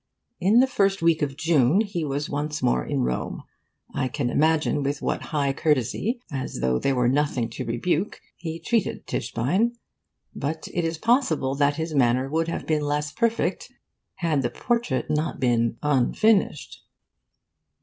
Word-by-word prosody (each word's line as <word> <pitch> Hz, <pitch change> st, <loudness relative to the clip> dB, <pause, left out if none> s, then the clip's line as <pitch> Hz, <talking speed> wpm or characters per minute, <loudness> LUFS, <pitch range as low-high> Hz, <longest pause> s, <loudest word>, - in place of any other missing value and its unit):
In 205 Hz, +7 st, +5 dB
the -, -, +5 dB
first 195 Hz, -8 st, +1 dB
week 165 Hz, -1 st, +3 dB
of 140 Hz, -2 st, -2 dB
June 165 Hz, -, +3 dB
he 200 Hz, -6 st, -3 dB
was 145 Hz, 0 st, -2 dB
once 150 Hz, +1 st, -3 dB
more 60 Hz, 0 st, +2 dB
in -, -, -1 dB
Rome. 60 Hz, 0 st, -3 dB, 0.5 s
I 130 Hz, -, 0 dB
can 125 Hz, -1 st, -2 dB
imagine 155 Hz, -1 st, +2 dB
with 140 Hz, +1 st, -1 dB
what -, -, -1 dB
high 140 Hz, -3 st, 0 dB
courtesy, 155 Hz, -, 0 dB
as 135 Hz, -, -4 dB
though 65 Hz, 0 st, +1 dB
there 135 Hz, -, +1 dB
were 125 Hz, -1 st, +2 dB
nothing 130 Hz, -3 st, 0 dB
to -, -, -5 dB
rebuke, 155 Hz, -, -1 dB, 0.2 s
he 165 Hz, -1 st, -6 dB
treated 230 Hz, +1 st, -1 dB
Tischbein. 185 Hz, -, 0 dB, 0.6 s
But 155 Hz, +3 st, -4 dB
it 170 Hz, -1 st, 0 dB
is 165 Hz, 0 st, -2 dB
possible 195 Hz, -, +2 dB
that 145 Hz, +1 st, +2 dB
his 160 Hz, 0 st, -3 dB
manner 130 Hz, -1 st, +3 dB
would 160 Hz, +3 st, 0 dB
have 165 Hz, -, -4 dB
been 155 Hz, -1 st, +1 dB
less 150 Hz, 0 st, -1 dB
perfect 230 Hz, +7 st, -1 dB, 0.4 s
had 165 Hz, -6 st, 0 dB
the 120 Hz, -, 0 dB
portrait 235 Hz, -, -1 dB
not 155 Hz, +2 st, -1 dB
been 115 Hz, -2 st, +1 dB
unfinished. 150 Hz, -, +1 dB
150 Hz, 160 wpm, -25 LUFS, 130-170 Hz, 0.6 s, In